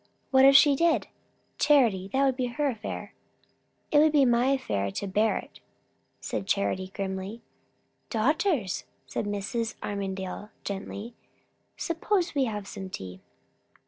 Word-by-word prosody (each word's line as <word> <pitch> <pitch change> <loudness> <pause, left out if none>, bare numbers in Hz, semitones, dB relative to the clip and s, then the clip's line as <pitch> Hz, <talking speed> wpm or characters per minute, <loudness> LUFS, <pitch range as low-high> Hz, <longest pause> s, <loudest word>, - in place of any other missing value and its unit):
What 265 0 +6
if 275 0 +7
she 285 0 +7
did, 335 +3 +2 0.5
Charity? 235 -11 +4
That 275 +4 +3
would 265 -2 +2
be 255 -1 -1
her 290 +4 -1
affair." 225 -4 -6 0.8
"It 295 - +6
would 310 +1 +5
be 290 -3 +5
my 240 +1 +3
affair 105 - 0
to 95 - -4
bear 210 +3 +2
it," - - -9 0.6
said 195 - -4
Charity 190 -2 0
grimly. 195 +3 -5 0.7
"Daughters," 255 - +1 0.2
said - - -3
Mrs. 205 +3 -2
Armadale 195 0 -4
gently, 200 +3 -5 0.6
"suppose 345 +2 0
we 275 -3 +2
have 210 -4 -4
some 190 -2 -7
tea." 95 - -8
225 Hz, 135 wpm, -27 LUFS, 195-275 Hz, 0.8 s, if